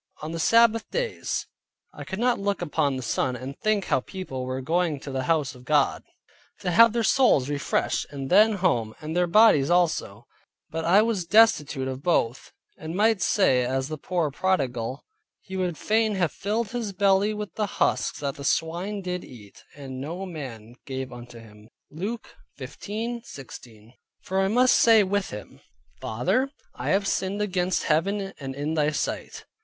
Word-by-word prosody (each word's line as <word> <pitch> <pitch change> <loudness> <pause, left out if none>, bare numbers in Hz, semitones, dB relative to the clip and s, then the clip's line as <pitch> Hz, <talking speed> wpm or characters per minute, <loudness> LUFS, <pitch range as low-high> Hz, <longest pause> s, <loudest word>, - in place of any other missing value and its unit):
On 155 - -4
the 165 - -4
Sabbath 230 +3 +4
days, - - -2 0.5
I - - -8
could 190 - -5
look 205 -5 0
upon 150 -4 0
the 130 - -5
sun 125 +2 -1
and 130 +3 -7
think 215 -2 +1
how - - +2
people 135 -4 -6
were 130 0 -3
going 160 +2 0
to 140 - -8
the 130 -1 -2
house 150 -4 +1
of 125 - -15
God, 145 +1 +2 0.6
to 185 -3 -1
have 230 +4 +6
their 235 -1 0
souls 220 - +4
refreshed; 145 0 -1
and 135 -2 -6
then 215 +4 +6
home, 125 - 0
and 155 +2 -5
their 180 0 +2
bodies 170 -7 +5
also; 165 - +1 0.5
but 160 0 -3
I 195 +5 +5
was 210 -7 -1
destitute 155 -10 +4
of 130 0 -5
both; 135 -7 0 0.3
and 160 +2 -6
might 215 0 +3
say 130 - +3
as 130 +2 -2
the 155 - -4
poor 170 -2 -1
prodigal, 135 -7 -1 0.4
"He 190 - -9
would 180 -4 -2
fain 220 -1 +1
have 175 -4 +1
filled 215 +2 -2
his 230 -4 -3
belly 195 +2 +3
with 210 -1 -5
the 210 -1 -1
husks - - 0
that 140 -2 -3
the 140 - -8
swine 175 +7 -1
did 180 0 -3
eat, 105 -6 -14
and 135 -2 -8
no 170 +7 -5
man 125 - -8
gave 130 -2 -5
unto 120 0 -11
him" 105 -1 -15 0.2
(Luke 205 +10 -6 0.2
15.16). 145 - -7 0.3
For 190 +1 0
I 190 - +2
must 245 +5 +4
say 225 -2 +6
with 200 +1 -1
him, 105 0 -9 0.4
"Father, 130 - 0 0.2
I - - -4
have 195 +1 +2
sinned 190 +2 -1
against 185 -3 0
Heaven 195 +5 0
and 135 -2 -6
in 145 +3 -2
thy 150 -2 +2
sight." 155 - -4
170 Hz, 170 wpm, -25 LUFS, 135-205 Hz, 0.6 s, have